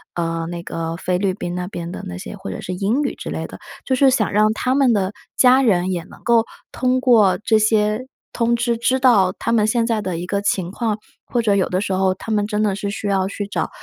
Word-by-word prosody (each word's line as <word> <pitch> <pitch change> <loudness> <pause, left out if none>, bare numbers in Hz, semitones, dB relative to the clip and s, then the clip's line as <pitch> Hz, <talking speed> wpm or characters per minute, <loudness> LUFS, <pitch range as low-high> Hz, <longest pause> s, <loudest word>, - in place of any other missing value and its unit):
呃， 165 -1 -2
那 170 0 -6
个 165 -1 -4
菲 180 0 -1
律 190 0 0
宾 175 -2 -5
那 180 0 -3
边 170 -2 -6
的 - - -6
那 90 - -6
些 - - -7
或 - - -7
者 90 - -6
是 185 - -5
英 205 +9 0
语 275 - -1
之 - - -7
类 - - -3
的。 - - -11 0.3
就 265 - 0
是 270 +1 +5
想 230 -5 +1
让 215 +1 +3
他 250 +3 0
们 270 -4 +4
的 195 -2 0 0.3
家 255 +1 +6
人 190 -7 +2
也 175 -2 -2
能 - - -16
够 235 -2 +3 0.3
通 255 0 0
过 225 -7 +5
这 220 -2 +3
些 215 +2 +1 0.3
通 235 0 +1
知 235 0 0
知 255 +3 +1
道 205 -8 +4
他 - - -2
们 215 -2 +3
现 230 +1 +1
在 225 -2 0
的 185 -4 -3
一 175 - -4
个 200 +2 -1
情 190 -3 -1
况， 220 0 -2 0.3
或 240 - 0
者 210 -3 +2
有 190 - +2
的 185 +1 -1
时 200 - -3
候 190 0 +2
他 205 +4 -7
们 205 -1 +1
真 210 0 0
的 205 -2 +1
是 200 0 -3
需 205 +1 -4
要 190 -1 +1
去 200 +1 -4
找 200 - -2
205 Hz, 275 characters per minute, -20 LUFS, 185-235 Hz, 0.3 s, 家